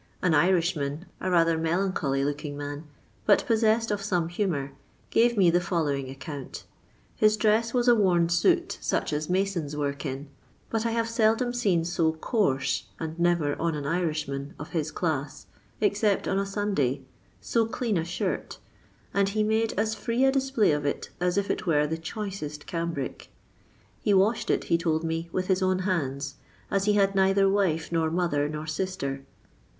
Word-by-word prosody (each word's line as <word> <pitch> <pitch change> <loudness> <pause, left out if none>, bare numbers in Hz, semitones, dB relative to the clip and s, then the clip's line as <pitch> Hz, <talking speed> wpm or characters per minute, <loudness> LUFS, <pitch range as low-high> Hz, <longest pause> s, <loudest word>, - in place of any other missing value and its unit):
An 180 -3 +3
Irishman, 165 -2 +1
a 185 - -2
rather 165 -2 +3
melancholy 160 -5 0
looking 145 0 -3
man, 145 +1 -6 0.4
but 205 - +5
possessed 225 0 +2
of 205 -1 -1
some 180 -4 0
humour, 170 -7 -1 0.4
gave 235 0 +3
me 180 -4 +5
the 175 +1 +3
following 145 -7 -1
account. 140 0 -7 0.5
His 215 0 +3
dress 220 +2 +2
was 245 0 +1
a 240 - +8
worn 180 -6 +3
suit, 170 0 +2
such - - -1
as 150 +2 -2
masons 180 -6 -1
work 140 -1 -2
in; 140 0 -4 0.4
but 225 0 0
I - - 0
have 230 0 0
seldom 230 +1 +2
seen 195 -9 +1
so 165 -2 +1
coarse, 160 - 0
and 160 0 -5
never 170 -4 +2
on 165 -1 0
an 145 -1 -4
Irishman 150 -4 -2
of 150 - -8
his 160 -3 -1
class, 150 -4 -3 0.3
except 205 -1 +1
on 195 - +1
a 200 - -1
Sunday, 190 - -1 0.4
so 230 -2 +1
clean 225 -1 -1
a 165 - +1
shirt, 175 +2 -3 0.6
and 200 0 +2
he 215 +1 0
made 220 +1 +1
as 215 +1 +1
free 235 +3 -1
a 270 - +5
display 265 - +2
of 150 0 0
it 145 - -3
as 180 +1 0
if 200 0 +1
it - - -4
were 150 -3 +3
the 160 +2 -3
choicest 165 -5 -5
cambric. 165 -5 -4 0.7
He 205 - +3
washed 205 +4 +2
it, - - +2
he 170 - +1
told 160 -1 0
me, 165 +1 -2
with 185 +1 -1
his 190 0 +1
own 185 0 +2
hands, 140 -6 -2 0.3
as 195 0 +1
he 210 - +3
had 195 -1 +3
neither 195 0 +4
wife, 185 -6 +1
nor 165 -1 +1
mo 175 +2 +1
ther, 145 -2 0
nor 150 0 -5
sister. 155 -4 -3
175 Hz, 175 wpm, -27 LUFS, 150-205 Hz, 0.7 s, a